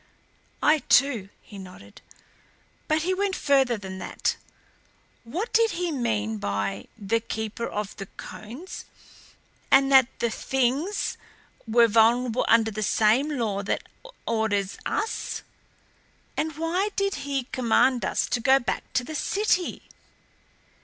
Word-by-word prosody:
"I, 305 Hz, +1 st, +5 dB
too," 250 Hz, -9 st, +3 dB
he 205 Hz, -, -11 dB
nodded. 180 Hz, -, -12 dB, 0.9 s
"But 310 Hz, 0 st, +1 dB
he 370 Hz, +2 st, +1 dB
went 390 Hz, 0 st, 0 dB
further 270 Hz, -4 st, +2 dB
than 190 Hz, -2 st, -7 dB
that. -, -, -2 dB, 0.9 s
What 350 Hz, -, -4 dB
did 455 Hz, -1 st, +4 dB
he 355 Hz, -1 st, -1 dB
mean 110 Hz, -, -1 dB
by 100 Hz, 0 st, -2 dB
the 220 Hz, +2 st, 0 dB
Keeper 220 Hz, 0 st, -4 dB
of 210 Hz, -1 st, -4 dB
the 195 Hz, -, -6 dB
Cones 260 Hz, -, -9 dB, 0.8 s
and 270 Hz, 0 st, +5 dB
that 265 Hz, -2 st, +7 dB
the 235 Hz, -, 0 dB
Things 270 Hz, -, -1 dB, 0.5 s
were 230 Hz, +1 st, +5 dB
vulnerable 230 Hz, +2 st, +3 dB
under 225 Hz, -1 st, +4 dB
the 215 Hz, +1 st, -4 dB
same 220 Hz, +7 st, +3 dB
law 210 Hz, -4 st, -1 dB
that 200 Hz, -, -2 dB, 0.4 s
orders 210 Hz, -4 st, 0 dB
us? 440 Hz, +2 st, -2 dB, 0.9 s
And 310 Hz, -1 st, -2 dB
why 350 Hz, +6 st, 0 dB
did 395 Hz, -1 st, +1 dB
he 275 Hz, -2 st, -2 dB
command 250 Hz, +1 st, +2 dB
us -, -, +1 dB
to 245 Hz, -, 0 dB
go 265 Hz, +3 st, +5 dB
back 240 Hz, -, -3 dB
to 250 Hz, -, +1 dB
the 310 Hz, -, -7 dB
city? 370 Hz, +2 st, 0 dB
240 Hz, 130 wpm, -26 LUFS, 210-305 Hz, 0.9 s, that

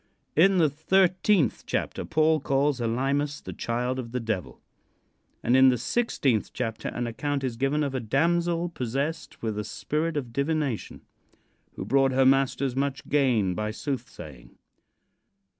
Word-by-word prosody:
In 190 Hz, +5 st, +5 dB
the 165 Hz, -3 st, +5 dB
thirteen 180 Hz, -, +2 dB, 0.2 s
chapter -, -, -2 dB
Paul 155 Hz, 0 st, +2 dB
calls 135 Hz, -1 st, +1 dB
Elymas 135 Hz, +5 st, 0 dB
the -, -, -8 dB
child 125 Hz, +2 st, -2 dB
of 115 Hz, -2 st, -7 dB
the 125 Hz, -, 0 dB
Devil, 110 Hz, -6 st, -4 dB, 0.8 s
and 120 Hz, -, +3 dB
in 130 Hz, 0 st, +7 dB
the 125 Hz, -, +2 dB
sixteenth 135 Hz, -, 0 dB
chapter 115 Hz, -3 st, -3 dB
an 120 Hz, -, -3 dB
account 140 Hz, +5 st, -2 dB
is 125 Hz, -3 st, -2 dB
given 135 Hz, +5 st, 0 dB
of 140 Hz, -2 st, -2 dB
"a 130 Hz, -, -1 dB
damsel 170 Hz, +8 st, +1 dB
possessed 140 Hz, +2 st, -4 dB
with 110 Hz, -2 st, -2 dB
a -, -, -2 dB
spirit 155 Hz, +9 st, -2 dB
of 125 Hz, -5 st, -4 dB
divination, 140 Hz, -3 st, -2 dB, 0.7 s
who -, -, -5 dB
brought 135 Hz, +1 st, +3 dB
her 130 Hz, 0 st, +4 dB
masters 135 Hz, -1 st, +2 dB
much 140 Hz, 0 st, -2 dB
gain 125 Hz, -10 st, +2 dB
by 105 Hz, +3 st, -2 dB
soothsaying." 105 Hz, -, -7 dB
135 Hz, 145 wpm, -26 LUFS, 120-150 Hz, 0.8 s, in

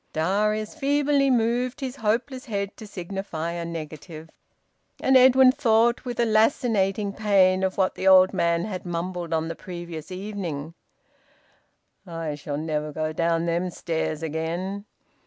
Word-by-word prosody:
Darius 210 Hz, +6 st, 0 dB
feebly 285 Hz, -1 st, +2 dB
moved 245 Hz, +1 st, +1 dB
his 265 Hz, -1 st, -5 dB
hopeless 250 Hz, +5 st, -1 dB
head 200 Hz, -4 st, -3 dB
to 215 Hz, -, -10 dB
signify 180 Hz, -3 st, -5 dB
a 170 Hz, 0 st, -4 dB
negative. 160 Hz, 0 st, -8 dB, 0.7 s
And 265 Hz, -, +3 dB
Edwin 260 Hz, 0 st, +7 dB
thought, 235 Hz, -3 st, +2 dB
with 245 Hz, -1 st, -5 dB
a 235 Hz, -, +4 dB
lancinating 215 Hz, -3 st, +1 dB
pain, 195 Hz, -3 st, +3 dB
of 190 Hz, 0 st, -1 dB
what 190 Hz, -1 st, +2 dB
the 190 Hz, -, -3 dB
old 185 Hz, 0 st, +7 dB
man 170 Hz, -2 st, +1 dB
had 190 Hz, -4 st, -5 dB
mumbled 175 Hz, 0 st, -4 dB
on 160 Hz, 0 st, 0 dB
the 165 Hz, -, -3 dB
previous 175 Hz, -1 st, -8 dB
evening: 180 Hz, -6 st, -5 dB, 1.3 s
"I 165 Hz, -3 st, -4 dB
shall 145 Hz, 0 st, -5 dB
never 150 Hz, -1 st, -2 dB
go 155 Hz, +1 st, -3 dB
down 165 Hz, 0 st, 0 dB
them 170 Hz, +2 st, 0 dB
stairs 160 Hz, -2 st, -3 dB
again." 170 Hz, +6 st, -3 dB
190 Hz, 140 wpm, -25 LUFS, 165-225 Hz, 1.3 s, Edwin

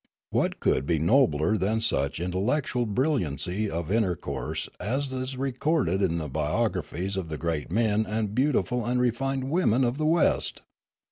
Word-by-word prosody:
What -, -, 0 dB
could 65 Hz, +2 st, +1 dB
be 85 Hz, -, +2 dB
nobler 85 Hz, -, +3 dB
than 105 Hz, +3 st, +1 dB
such 70 Hz, -11 st, 0 dB
intellectual 115 Hz, -, 0 dB
brilliancy 105 Hz, -, 0 dB
of 85 Hz, -1 st, -3 dB
intercourse 90 Hz, -10 st, -1 dB
as 130 Hz, +7 st, -1 dB
is 130 Hz, 0 st, -4 dB
re 135 Hz, +1 st, -1 dB
corded 125 Hz, -, +1 dB
in 85 Hz, -4 st, +1 dB
the 80 Hz, -2 st, -3 dB
biographies 90 Hz, -, -1 dB
of 90 Hz, -4 st, -3 dB
the 75 Hz, -, -4 dB
great 80 Hz, -3 st, -2 dB
men 110 Hz, +1 st, +2 dB
and 105 Hz, -1 st, -2 dB
beautiful 125 Hz, -1 st, +1 dB
and 125 Hz, +2 st, 0 dB
refined 130 Hz, +2 st, 0 dB
women 135 Hz, -8 st, +3 dB
of 125 Hz, +4 st, 0 dB
the 155 Hz, -, +1 dB
West 165 Hz, +1 st, +1 dB
110 Hz, 155 wpm, -27 LUFS, 85-130 Hz, -, nobler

